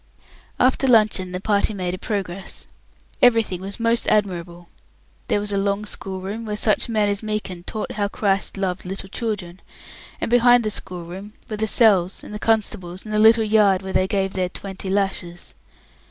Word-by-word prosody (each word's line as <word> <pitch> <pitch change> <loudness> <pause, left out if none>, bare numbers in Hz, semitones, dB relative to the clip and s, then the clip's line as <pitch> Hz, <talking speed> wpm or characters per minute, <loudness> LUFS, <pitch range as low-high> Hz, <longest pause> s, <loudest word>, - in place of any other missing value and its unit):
After 260 +1 +3
luncheon 215 -6 +4
the 180 - -3
party 205 +1 +1
made 180 -2 -2
a - - -3
progress. 195 -4 -4 0.6
Everything 225 -7 +3
was 195 +4 -5
most 230 0 +1
admirable. 175 -4 -1 0.6
There - - +1
was 205 0 -4
a 200 - 0
long 200 +1 -1
schoolroom, 195 +2 -5
where 210 -2 -3
such 215 +2 +2
men 215 -2 +2
as 200 0 -1
Meekin 210 -5 -4
taught 215 - -4
how 205 -1 -1
Christ 200 -1 -1
loved 190 -2 -2
little 195 +1 -5
children; 195 -5 -4 0.6
and - - -3
behind 245 0 +5
the 215 - -1
schoolroom 185 +3 -6
were 215 - -5
the 220 +1 0
cells 195 -6 +3
and - - -9
the 210 - -5
constables 205 -5 -1
and 215 - -6
the 210 - +2
little 225 +1 +6
yard 210 -3 +3
where 190 - -5
they 185 - +2
gave 195 -1 -1
their 185 -1 -1
"twenty 190 +1 -7
lashes". 190 -3 -2
200 Hz, 175 wpm, -22 LUFS, 185-215 Hz, 0.6 s, little